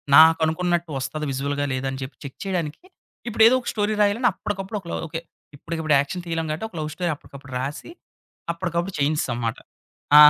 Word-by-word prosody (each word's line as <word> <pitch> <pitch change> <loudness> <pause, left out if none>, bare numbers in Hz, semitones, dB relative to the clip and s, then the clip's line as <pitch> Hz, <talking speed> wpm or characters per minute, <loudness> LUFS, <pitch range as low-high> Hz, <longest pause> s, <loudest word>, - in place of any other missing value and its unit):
నాకనుకున్నట్టు 160 +2 +5
వస్తాది 150 +3 -3
విజువల్‌గా 140 +2 -1
లేదా 130 +1 -1
అని 135 - -5
చెప్పి 130 0 -6
చెక్ 140 -2 -8
చేయడానికి, 175 - -2 0.4
ఇప్పుడు 225 -1 +4
ఏదో 250 - +6
ఒక - - -11
స్టోరీ 210 0 +1
రాయాలని 210 +5 +4
అప్పటికప్పుడు 195 +2 -3
ఒకల 170 - -8 0.2
ఓకే. 165 +1 -4 0.3
ఇప్పటికిప్పుడు 155 0 0
యాక్షన్ 175 +5 -2
తీయలేం 165 -1 -1
కాబట్టి, 155 +8 -2
ఒక 190 - -16
లవ్ 155 0 -2
స్టోరీ 175 +1 -1
అప్పటికప్పుడు 140 -2 -12
రాసి, 140 - -4 0.6
అప్పటికప్పుడు 175 +1 -2
చేయించేసాంమాట. 125 -6 0 0.6
ఆ! - - +12
160 Hz, 165 wpm, -24 LUFS, 145-180 Hz, 0.6 s, ఆ